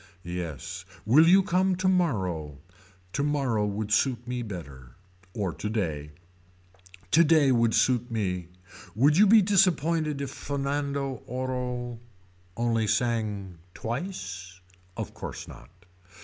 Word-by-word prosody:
Yes. 85 -6 -5 0.2
Will 145 +9 +6
you 190 +3 +6
come 185 0 +2
tomorrow. 110 - 0 0.6
Tomorrow 135 -7 0
would 105 +1 -3
suit 120 +1 +1
me 125 0 -2
better. 70 - -8 0.4
Or 100 -6 -1
today. 85 -9 -3 1.0
Today 155 -3 +5
would 115 -2 +3
suit 125 -1 +2
me. 90 -6 -2 0.5
Would 140 +7 +4
you 205 +4 +6
be 215 +1 +7
disappointed 165 -6 +2
if 140 -1 -4
Fernando 140 -2 -3
Orro 125 -1 -3 0.6
only 115 -2 +1
sang 105 -5 -1 0.2
twice. 100 - -5 0.4
Of - - -5
course - - -7
not. - - -12
120 Hz, 105 wpm, -27 LUFS, 100-145 Hz, 1.0 s, be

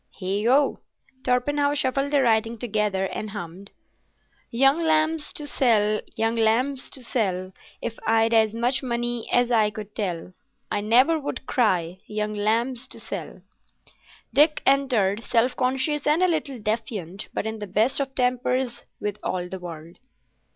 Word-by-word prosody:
Heigho!" 215 +9 +2 0.5
Torpenhow 285 +3 +1
shuffled 275 0 0
the 285 -2 +3
writing 225 0 +2
together 210 -4 0
and 215 +2 -4
hummed— 195 0 -8 0.8
Young 270 +6 +3
lambs 315 -1 +2
to 295 - -5
sell, 215 -7 +2
young 225 +1 +1
lambs 240 +5 +1
to 260 - -11
sell, 190 -6 -2 0.3
If 230 - -4
I'd 225 +1 +3
as 220 -1 +3
much 245 +3 +2
money 240 -2 -3
as 245 0 +3
I 220 -3 +4
could 210 0 -9
tell, 180 -4 -3 0.4
I 205 - 0
never 255 +10 +4
would 285 -2 -5
cry, 185 - +1
Young 210 0 -2
lambs 230 +5 0
to 230 - -11
sell! 190 -4 -7 0.9
Dick 300 +2 +4
entered, 235 -7 +2
self 245 +2 +2
conscious 265 +3 0
and 310 +5 +3
a - - +5
little 310 -6 -1
defiant, 210 -4 -3
but - - -3
in 220 0 -4
the 205 - -5
best 220 +9 +2
of 270 -1 -3
tempers 250 -1 0 0.2
with 210 0 -3
all 180 -1 -2
the 190 - -6
world. 170 -1 -9
230 Hz, 150 wpm, -24 LUFS, 210-265 Hz, 0.9 s, a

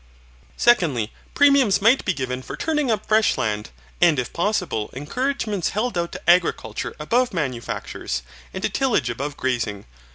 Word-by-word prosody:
Secondly, 155 - +3 0.2
premiums 275 -7 +5
might 230 +6 +4
be - - +2
given 130 -5 -3
for - - -8
turning 300 -4 0
up 215 -2 0
fresh 220 0 +3
land, 105 -1 -2 0.3
and 170 -4 +5
it 125 - -3
possible 175 - -1
encouragements 215 - -2
held 225 +2 -2
out 170 -1 -1
to - - -9
agriculture 170 -11 +1
above 240 +8 +1
manufactures, 125 - -3 0.3
and 190 - -6
to - - +1
tillage 240 - +1
above 140 +5 -5
grazing. 115 -6 -2
175 Hz, 150 wpm, -22 LUFS, -, 0.3 s, premiums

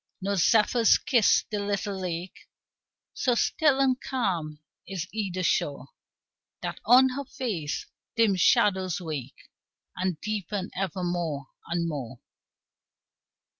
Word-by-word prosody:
No 200 +1 -1
zephyrs 225 +4 +4
kiss 245 -8 +3
the 210 - -1
little 200 0 -2
lake; 180 0 -6 0.6
So 245 -2 +1
still 290 +2 +2
and 260 -2 +2
calm 175 - -2 0.3
is 185 -2 -4
either 190 -4 -2
shore, 140 -4 0 0.7
That - - -4
on 260 +2 +7
her 275 +2 -4
face 200 - -3 0.3
dim 225 -4 +3
shadows 185 -1 +3
wake 150 -7 -7 0.4
And 185 -3 -2
deepen 205 -2 -3
ever 185 -1 -2
more 165 -6 -2 0.2
and 170 0 -1
more. 130 -6 -5
190 Hz, 115 wpm, -27 LUFS, 170-220 Hz, 0.7 s, on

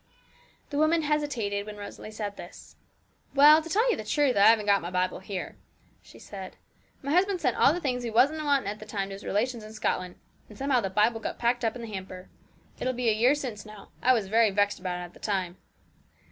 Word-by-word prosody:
The 285 - -1
woman 315 +1 +3
hesitated 250 -10 -1
when 210 0 -8
Rosalie 205 +1 -9
said 210 -2 -5
this. 175 - -12 0.6
'Well, 300 +3 +8
to 325 - -9
tell 440 +8 +2
you - - +1
the - - -6
truth, 290 -4 +1
I 200 0 +6
haven't 220 -2 +5
got 200 -1 +3
my 170 - -5
Bible 185 0 -1
here,' 190 -1 -6 0.4
she - - -17
said. 190 -2 -9 0.5
'My 280 - -2
husband 370 +3 +2
sent - - 0
all - - +5
the 350 - -2
things 250 -6 -2
we 235 - -3
wasn't 275 +8 +3
wanting 280 -6 +1
at 210 +1 -4
the 215 - -11
time 200 -2 -3
to - - -7
his 195 - -9
relations 230 +3 -1
in 215 0 -10
Scotland; 185 -4 -2 0.3
and 210 - -13
somehow 270 -2 +1
the 195 - -2
Bible 210 +4 +2
got - - -5
packed 240 +1 0
up 225 0 0
in 240 - -7
the - - -6
hamper. 185 -1 -8 0.5
It - - -4
will 255 - 0
be 245 -1 0
a - - +3
year 240 +6 +3
since 250 -8 -5
now. 215 -1 -13
I 255 - +5
was 225 -5 0
very 225 +2 +4
vexed 205 +1 +1
about 180 -1 -4
it - - -5
at 175 - -11
the - - -17
time.' 190 -4 -2
220 Hz, 235 wpm, -27 LUFS, 200-270 Hz, 0.6 s, Well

